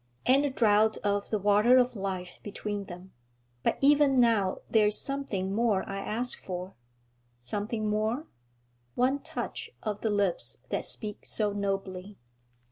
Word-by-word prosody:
'And 270 +3 +5
a - - +1
draught 220 -4 +3
of 205 -1 0
the 215 - +1
water 210 +5 +5
of 250 -1 +3
life 190 -3 -4
between 205 0 -5
them. 180 +1 -11 0.5
But - - +1
even 280 -1 +5
now 220 -6 +2
there 215 -2 +4
is 210 - +2
something 225 -9 -2
more 215 -3 +1
I 195 0 -4
ask 235 +5 0
for.' 180 0 -5 0.7
'Something 210 - -3
more?' 215 +7 0 0.7
'One 260 +3 +2
touch - - -5
of 210 -2 -3
the 220 - 0
lips 200 - -1
that - - -2
speak 210 -1 -4
so 210 -2 +1
nobly.' 195 -1 -3
210 Hz, 145 wpm, -29 LUFS, 195-235 Hz, 0.7 s, And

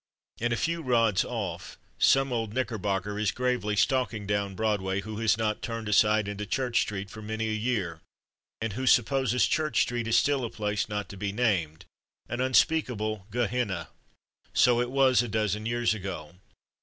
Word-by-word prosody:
And 120 +1 0
a 120 - +1
few 170 +1 -1
rods 115 - +2
off - - -5 0.2
some 135 -1 +4
old 115 -3 -2
Knickerbocker 105 -5 -2
is 105 -4 +1
gravely 125 -4 -1
stalking 115 0 +1
down 100 -1 -1
Broadway 100 -2 0
who 110 +1 -7
has 110 -1 +2
not 110 -2 -1
turned 115 -2 -4
aside 105 0 +3
into 105 0 -4
Church 130 -3 +1
Street 100 -1 -4
for 110 - -9
many 110 +1 -3
a - - -1
year, 105 -8 -2 0.6
and 110 -2 -3
who 130 +4 -3
supposes 125 0 +3
Church 155 -7 +1
Street 120 -2 -3
is 115 - +3
still 140 -3 +2
a 115 - -2
place 105 -1 -2
not 105 -1 -3
to 100 - -9
be 100 0 -2
named, 95 -9 0 0.4
an 120 - -3
unspeakable 120 -7 +1
Gehenna. 110 -6 -1 0.6
So 120 0 +4
it 120 - -1
was 130 -2 +4
a 120 - -3
dozen 110 0 -1
years 120 -1 +1
ago. 90 -7 -6
110 Hz, 170 wpm, -28 LUFS, 105-125 Hz, 0.6 s, some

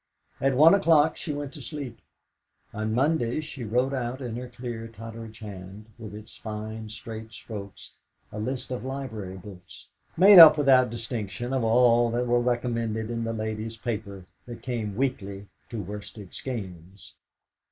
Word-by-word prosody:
At 135 -1 +2
one 160 +4 +8
o'clock 160 -5 +4
she 160 - -5
went 145 -1 -5
to 150 - -10
sleep. 135 -5 -7 0.7
On 110 +1 -2
Mondays 140 +2 +1
she 135 -4 -7
wrote 125 +5 +1
out 125 0 -3
in 120 -4 -5
her 125 +1 -6
clear 120 -2 -6
Totteridge 115 0 -9
hand, 100 0 -9
with 110 -2 -8
its 105 0 -10
fine 110 0 -6
straight 110 0 -8
strokes, 100 -3 -9 0.4
a 105 - -6
list 125 +4 -4
of 125 -3 -3
library 115 -8 -5
books, 95 -1 -13 0.3
made 190 +2 +10
up 155 -2 +11
without 130 -3 +5
distinction 115 0 -4
of 130 -3 +1
all 120 +1 +4
that 120 +2 0
were 120 0 +2
recommended 115 -2 -1
in 115 -1 -2
the 115 - -2
Ladies' 110 0 -4
Paper 105 -5 -5 0.2
that 120 -1 -9
came 115 -6 -3
weekly 100 -6 -2 0.2
to 115 -3 -5
Worsted 105 0 -9
Skeynes. 95 -6 -7
115 Hz, 155 wpm, -27 LUFS, 110-130 Hz, 0.7 s, up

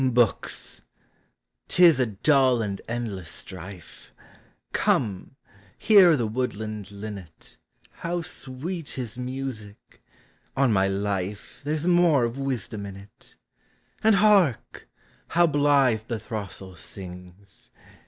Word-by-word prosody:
Books! 120 -4 0 0.9
't 180 - +4
is 165 -6 +6
a 125 - +2
dull 130 +4 +3
and 100 -2 -4
endless 110 -8 -4
strife; 90 +1 -10 0.6
Come, 105 0 0 0.4
hear 185 -7 +6
the 120 - 0
woodland 110 -3 -3
linnet 100 -5 -10
— - - -32
How 170 0 -2
sweet 160 +1 -6
his 125 -3 -5
music! 125 -5 -7 0.6
on 135 -4 +3
my 95 -1 +3
life, 100 0 -3
There 150 +2 -1
's 155 - -4
more 175 -6 +4
of 120 +3 -2
wisdom 115 -6 -3
in 100 - -8
it! 100 +1 -15 0.7
And 220 -1 +5
hark! 200 - +2 0.4
how 175 +1 +4
blithe 140 -7 +3
the 115 -2 -3
throstle 100 -4 -7
sings 90 +2 -10
115 Hz, 115 wpm, -25 LUFS, 100-140 Hz, 0.9 s, is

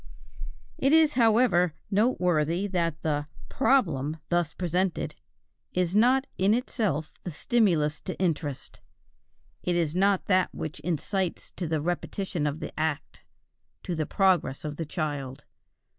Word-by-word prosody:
It 275 +3 +3
is, 315 -2 +5
however, 220 - +3 0.2
noteworthy 180 - +2
that 170 -5 -1
the 145 -2 -1 0.2
"problem" 165 - +1
thus 175 -2 +1
presented 180 +1 -1 0.6
is 180 0 0
not 255 +5 +4
in 195 +3 +4
itself 210 - -2
the - - -4
stimulus 165 -4 +1
to 185 - -4
interest; 155 -6 -2 0.8
it 180 - 0
is 165 -3 +1
not 195 +1 +2
that 185 -2 +3
which 155 -1 -5
incites 175 +3 -2
to 175 - -4
the 155 -1 -1
repetition 175 0 -2
of 150 +2 -3
the - - -5
act 155 -2 -2 0.6
to 180 - -3
the 155 -2 -2
progress 180 -8 +1
of 150 -1 -4
the 165 - -4
child. 145 -5 -4
175 Hz, 130 wpm, -27 LUFS, 155-200 Hz, 0.8 s, is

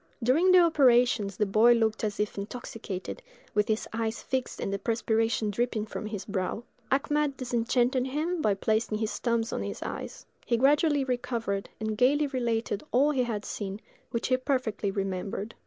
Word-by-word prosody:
During 315 +10 +4
the 370 - +8
operations 250 - +4
the 210 - +2
boy 215 +4 +5
looked 225 -2 +1
as 210 -1 -2
if 210 0 -1
intoxicated, 205 - -6 0.3
with 210 0 +2
his 220 0 -1
eyes 225 0 -2
fixed 260 -1 -2
and 195 - -2
the 200 - -2
perspiration 225 0 0
dripping 225 0 -1
from 215 - -6
his 210 -2 -5
brow. 200 +2 -2 0.3
Achmed 285 +1 +1
disenchanted 250 +1 +1
him 315 +5 -1
by 210 -6 +2
placing 215 +2 0
his 220 0 -2
thumbs 235 -1 0
on - - -2
his - - -5
eyes. - - -6 0.2
He 235 - +1
gradually 290 +3 +3
recovered, 235 -6 -2
and 220 0 -2
gayly 275 +6 +3
related 235 -6 -1
all 280 +5 +4
he 265 -3 +1
had 215 -3 -3
seen, 200 -1 -5 0.3
which 235 -1 -2
he 255 - +4
perfectly 255 -6 -1
remembered. 195 +2 -3
230 Hz, 170 wpm, -28 LUFS, 210-260 Hz, 0.3 s, the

